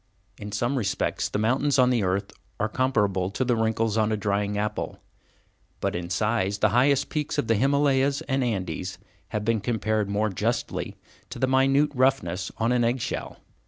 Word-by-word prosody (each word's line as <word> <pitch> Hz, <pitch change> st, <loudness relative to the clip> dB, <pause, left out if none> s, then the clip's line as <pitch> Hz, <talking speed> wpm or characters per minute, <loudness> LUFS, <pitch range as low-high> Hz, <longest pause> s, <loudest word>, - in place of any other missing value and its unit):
In 105 Hz, -1 st, -7 dB
some 120 Hz, +6 st, 0 dB
respects 100 Hz, -4 st, -1 dB
the -, -, -2 dB
mountains 130 Hz, +7 st, +2 dB
on 125 Hz, -1 st, +5 dB
the 120 Hz, -3 st, +2 dB
earth 100 Hz, +1 st, -1 dB, 0.3 s
are 110 Hz, -, +1 dB
comparable 105 Hz, -7 st, +1 dB
to 130 Hz, +6 st, -2 dB
the 120 Hz, -1 st, +2 dB
wrinkles 110 Hz, -1 st, 0 dB
on 110 Hz, 0 st, +2 dB
a 110 Hz, -, +1 dB
drying 100 Hz, 0 st, -1 dB
apple, 105 Hz, +1 st, -3 dB, 0.8 s
but -, -, -1 dB
in 85 Hz, 0 st, -4 dB
size, 100 Hz, +1 st, 0 dB
the 110 Hz, +1 st, +3 dB
highest 130 Hz, +5 st, +3 dB
peaks 150 Hz, -2 st, -2 dB
of -, -, +1 dB
the 115 Hz, -, +2 dB
Himalayas 140 Hz, +3 st, +2 dB
and 135 Hz, -1 st, -1 dB
Andes 95 Hz, -9 st, -3 dB, 0.3 s
have 105 Hz, -1 st, -3 dB
been 115 Hz, -2 st, +1 dB
compared 110 Hz, -2 st, 0 dB
more 105 Hz, +2 st, +1 dB
justly 95 Hz, -, -2 dB, 0.3 s
to -, -, -7 dB
the 130 Hz, -, +2 dB
minute 135 Hz, +3 st, +3 dB
roughness 125 Hz, -9 st, +1 dB
on 115 Hz, +2 st, +1 dB
an 125 Hz, -1 st, +2 dB
egg 120 Hz, +3 st, +1 dB
shell. -, -, -4 dB
110 Hz, 180 wpm, -26 LUFS, 105-130 Hz, 0.8 s, on